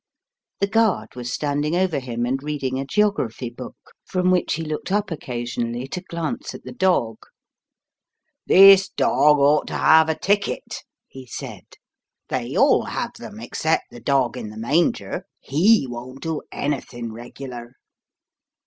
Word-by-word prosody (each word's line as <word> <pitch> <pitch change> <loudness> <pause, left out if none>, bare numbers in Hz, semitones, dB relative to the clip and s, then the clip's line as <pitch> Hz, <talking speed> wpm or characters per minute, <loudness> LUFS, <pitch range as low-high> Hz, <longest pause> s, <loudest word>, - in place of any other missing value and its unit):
The - - +4
guard 200 - +1
was 125 0 -5
standing 150 +3 -1
over 180 -4 +1
him 120 -2 -3
and 130 +2 -1
reading 140 -3 -3
a 135 - -3
geography 135 - 0
book, 125 +1 -9 0.3
from 185 0 0
which 180 -4 +1
he 165 - -4
looked 155 +3 -4
up 205 -1 0
occasionally 120 -3 -4
to 180 - -4
glance 170 +5 -5
at - - -11
the - - -8
dog. 175 - +1 1.3
"This 195 0 +8
dog 150 0 +3
ought 145 +1 +3
to - - -3
have 160 0 +5
a 160 - 0
ticket," 200 +4 -1 0.3
he 130 -1 -12
said; - - -8 0.6
"they - - -3
all - - +4
have - - -4
them - - -9
except - - -1
the 120 - -11
dog 130 0 +1
in 115 -4 -6
the 110 - -11
manger; 145 +10 0 0.2
he 175 +6 +3
won't 125 +2 -8
do 160 -2 -2
anything 120 -5 -4
regular." 120 +1 -9
140 Hz, 150 wpm, -22 LUFS, 120-175 Hz, 1.3 s, This